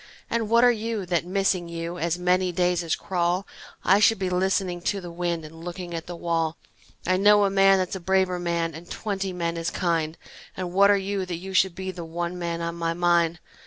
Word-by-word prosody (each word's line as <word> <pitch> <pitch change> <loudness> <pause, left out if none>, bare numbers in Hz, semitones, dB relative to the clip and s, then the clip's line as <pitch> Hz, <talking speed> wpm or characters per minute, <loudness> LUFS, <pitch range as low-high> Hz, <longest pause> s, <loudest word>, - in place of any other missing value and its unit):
And 230 -2 0
what 235 +1 +5
are 245 - +7
you 225 -3 -3
that, 175 -1 0
missing 185 -2 0
you, 170 +1 -5
As 170 0 0
many 180 +1 +2
days 180 0 +1
as 165 - 0
crawl 180 +1 -1 0.4
I 195 +3 +5
should 225 +2 +5
be 190 -1 -2
listening 185 -1 0
to 200 +3 -1
the 175 -2 -8
wind 170 -1 -2
And 165 +2 -11
looking 175 0 -6
at 165 -1 -5
the 175 - -6
wall? 165 -1 -1 0.5
I 185 +1 +2
know 205 +1 +5
a 195 - +1
man 195 0 +5
that's 185 0 -1
a - - -4
braver 185 0 +1
man 170 -1 -1
And 165 +3 -11
twenty 195 -3 -3
men 170 -2 -2
as 165 - -1
kind, 165 -3 -1 0.4
And 180 -2 -4
what 200 +2 +6
are 205 - +5
you, 195 -1 -2
that 175 - -3
you 190 +2 -8
should 190 -1 +3
be 190 0 -4
The 175 -2 -7
one 170 +2 -4
man 170 -1 -3
on 170 0 -2
my 165 0 -1
mind? 170 -1 +2
180 Hz, 225 wpm, -25 LUFS, 170-190 Hz, 0.5 s, are